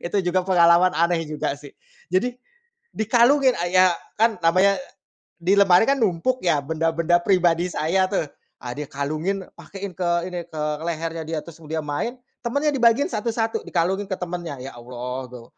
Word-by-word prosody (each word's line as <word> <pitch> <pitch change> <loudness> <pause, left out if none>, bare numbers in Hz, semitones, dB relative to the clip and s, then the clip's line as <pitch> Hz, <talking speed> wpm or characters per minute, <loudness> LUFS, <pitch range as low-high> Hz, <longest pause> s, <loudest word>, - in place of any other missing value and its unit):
itu 175 +4 -1
juga 185 +1 +2
pengalaman 180 -1 +5
aneh 170 0 +2
juga 150 -2 -2
sih, 145 -1 -12 0.4
jadi 240 +7 +1 0.6
dikalungin 245 +4 +3
a 175 - -1
ya 185 0 +6 0.3
kan 225 -1 +3
namanya 185 +4 +4
e - - -7 0.6
di 180 +4 +2
lemari 195 -2 +6
kan, 275 -1 +2
numpuk 220 +5 +1
ya, 165 -5 +3
benda-benda 165 +2 +1
pribadi 175 -2 +2
saya 185 +5 +1
tuh, 195 -5 0 0.4
ah, 125 - -4
dia 150 +2 -5
kalungin, 155 +8 -2
pakein 195 -1 -8
ke 175 +1 -2 0.2
ini 175 -1 -5
ke 160 -2 -8 0.2
lehernya, 165 -1 -3
dia 160 - -3
terus 170 -1 -13
dia 160 +1 -2
main 150 - -3 0.3
temennya 285 +5 0
dibagiin 245 +2 +3
satu-satu, 225 0 -1
dikalungin 185 +4 0
ke 190 - -1
temennya. 175 -4 -5
Ya, 135 - -7
Allah, 125 +1 -6
gu 125 -1 -10
175 Hz, 165 wpm, -23 LUFS, 160-200 Hz, 0.6 s, ya